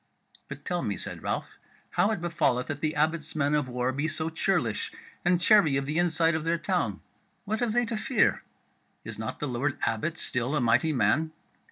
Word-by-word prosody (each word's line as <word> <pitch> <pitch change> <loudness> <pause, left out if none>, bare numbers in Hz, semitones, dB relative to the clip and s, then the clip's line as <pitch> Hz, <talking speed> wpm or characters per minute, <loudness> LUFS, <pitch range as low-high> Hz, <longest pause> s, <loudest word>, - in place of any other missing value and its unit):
"But - - -9
tell - - -1
me," - - -2
said - - -7
Ralph, - - -3 0.3
"how 205 - +3
it 220 -6 -1
befalleth 155 -7 +1
that 145 -1 -4
the 155 +1 0
Abbot's 160 +1 0
men 145 -1 +1
of 145 -3 +1
war 125 +1 0
be 145 +4 -1
so 155 +1 -2
churlish, 160 - 0 0.3
and 175 0 +3
chary 175 -6 +5
of 135 - -1
the 150 +4 0
inside 165 -1 +3
of 160 -1 -1
their 165 +1 +1
town; 165 - -1 0.4
what 215 +2 -1
have 240 -3 0
they 240 +1 +3
to 230 0 -3
fear? 240 +4 +2 0.6
Is - - -7
not - - -4
the 145 - -2
Lord 130 +3 -1
Abbot 155 +10 0
still 125 +1 -1
a - - +2
mighty 125 +6 +3
man?" 155 +3 +2
155 Hz, 200 wpm, -28 LUFS, 140-175 Hz, 0.6 s, chary